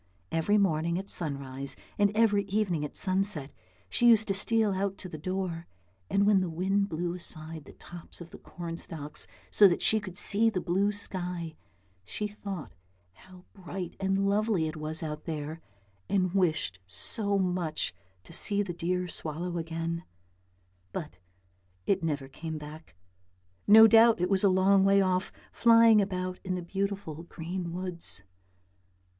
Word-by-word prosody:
Every 165 +6 +2
morning 170 -3 +1
at 195 +1 -6
sunrise 140 -4 -3 0.2
and 205 -1 +4
every 210 -3 +3
evening 195 -6 -1
at 150 - -6
sunset 185 -7 -1 0.4
she 240 - +2
used 220 -2 +5
to - - +2
steal 215 +1 +2
out 195 +1 -2
to 185 - -8
the 155 -3 -8
door, 180 -1 -3 0.4
and 200 0 +2
when 205 -2 +4
the 185 - -2
wind 195 +4 0
blew 170 +1 -2
aside 160 -3 -4
the - - -13
tops 175 -1 -10
of 170 -1 -11
the - - -11
corn 170 -1 -7
stalks 150 -3 -6 0.2
so 205 - +7
that 175 - 0
she 220 - +4
could 190 -4 -9
see 225 +3 +6
the 195 - -2
blue 190 +4 +1
sky, 180 -5 0 0.5
she 210 - -4
thought 195 - -7 0.4
how 185 - -17
bright 180 -2 -7
and 195 0 +1
lovely 200 -4 +1
it 155 - -5
was 155 +1 -4
out 150 -1 -5
there, 155 0 -5 0.5
and 185 -2 +1
wished 160 - +1
so 200 - 0
much 180 - -1 0.3
to - - -14
see 205 -1 +1
the 180 -3 -5
dear 180 +2 -2
swallow 170 +2 -4
again; 165 +1 -4 0.9
but 90 +1 -6 0.7
it 195 -1 +1
never 145 -4 -2
came 160 +3 -6
back; 150 - -11 0.7
no 220 +2 +10
doubt 225 0 +6
it 180 +2 0
was 195 0 +3
a 200 - +6
long 190 +1 +4
way 195 0 +5
off, 185 0 +1 0.2
flying 230 -2 +6
about 185 -2 -3
in 185 -1 -2
the 180 - -4
beautiful 195 -3 -3
green 170 +1 -6
woods. 175 - -4
180 Hz, 160 wpm, -29 LUFS, 165-200 Hz, 0.9 s, no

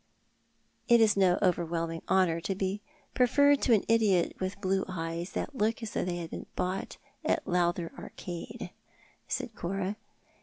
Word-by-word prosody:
" - - -43 0.3
It 235 0 +6
is 220 -2 +5
no 190 -3 +4
overwhelming 165 -2 0
honour 185 -3 +3
to 195 +3 -2
be 195 +2 -2 0.3
preferred 285 +3 +4
to 240 - +4
an 205 - +1
idiot 210 -6 +3
with 190 +1 -3
blue 190 0 +1
eyes 170 -1 -4
tliat - - -2
look 225 -1 0
as 220 - -6
if - - 0
they 175 -1 -1
had 165 -2 -6
been - - -6
bought 185 +1 -2 0.3
in - - +3
the - - -5
Lowther 175 -1 +1
Arcade," 175 -2 -7 0.6
said 230 - -3
Cora. 195 +2 -3
190 Hz, 165 wpm, -30 LUFS, 175-210 Hz, 0.6 s, It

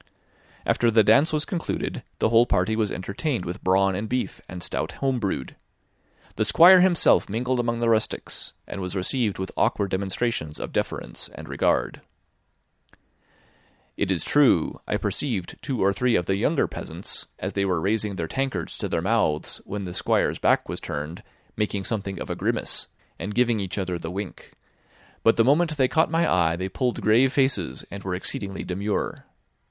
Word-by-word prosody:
After 120 - +2
the 110 -1 +5
dance 140 +9 +5
was 155 0 0
concluded, 175 -5 -3 0.2
the - - +2
whole 115 +1 +5
party 110 - +1
was 110 -2 0
entertained 100 - -3
with 85 +1 -6
brawn 95 +1 +3
and 105 +3 -3
beef, 125 0 -2
and 90 -2 -7
stout - - -2
home 135 -2 -1
brewed. 100 -4 -3 0.8
The - - +2
Squire 170 - +8
himself 180 -2 +4
mingled 125 +4 -1
among 120 -1 -1
the 120 - +2
rustics, 110 -1 -1
and 100 - -6
was 90 +1 -4
received 105 +3 0
with 95 0 -4
awkward 100 -2 +1
demonstrations 95 -4 -2
of - - -5
deference - - -3
and - - -9
regard. - - 0 1.9
It 100 - -1
is 95 -3 +2
true, 135 - +3
I - - 0
perceived 110 -11 -3
two 130 -7 -2
or 100 +1 +3
three 125 +3 +1
of 90 - +1
the 95 - +1
younger 140 +9 +1
peasants, - - -4
as 95 +1 -4
they 100 - 0
were 90 -3 +1
raising 105 +3 0
their 85 -3 -3
tankards 135 +9 -3
to - - -2
their - - -1
mouths 75 0 0
when 100 0 -5
the 90 -2 -6
Squire's - - +1
back - - +2
was - - -4
turned, 75 +4 -5 0.3
making 105 -2 -1
something 100 -2 -3
of - - -5
a - - -2
grimace, - - 0 0.3
and 100 +2 -5
giving 120 -2 +2
each 95 -1 -3
other 90 -3 -2
the 80 - -5
wink; 95 +1 -7 0.7
but 115 - +4
the 115 - +4
moment 155 +3 +3
they 130 -2 +4
caught 160 +5 +2
my 165 +1 +2
eye 85 -2 +2
they 95 +2 -3
pulled 125 +5 -1
grave 120 +5 +4
faces, 125 - +1
and 100 -1 -7
were 95 -1 -2
exceedingly 95 +1 -3
demure. 100 +3 -3
105 Hz, 180 wpm, -25 LUFS, 95-125 Hz, 1.9 s, Squire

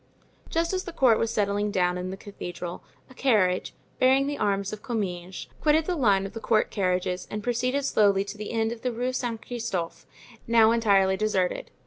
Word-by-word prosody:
Just 335 +2 0
as 370 0 -2
the 345 - -6
court 250 -8 +4
was 230 - 0
settling 205 -1 0
down 180 -3 +1
in 180 +1 -4
the 190 - -6
cathedral, 175 -3 -7 0.2
a - - -16
carriage, 210 -9 +1 0.2
bearing 265 +2 +4
the 290 +1 -2
arms 200 0 0
of 210 - -7
Comminges, 185 -7 -4 0.2
quitted 310 +1 +3
the 360 - -1
line 200 - +3
of 195 - -7
the 225 - -5
court 220 -1 +1
carriages 185 -2 -1
and 210 0 -5
proceeded 250 +4 0
slowly 200 -6 +3
to 200 - -8
the 210 0 -6
end 225 -1 0
of 235 -1 -7
the 250 - -1
Rue 245 +2 -2
Saint 235 -3 -3
Christophe, 190 -9 -4 0.4
now 230 -1 +5
entirely 200 -4 +3
deserted. 195 -4 -1
215 Hz, 190 wpm, -26 LUFS, 190-245 Hz, 0.4 s, now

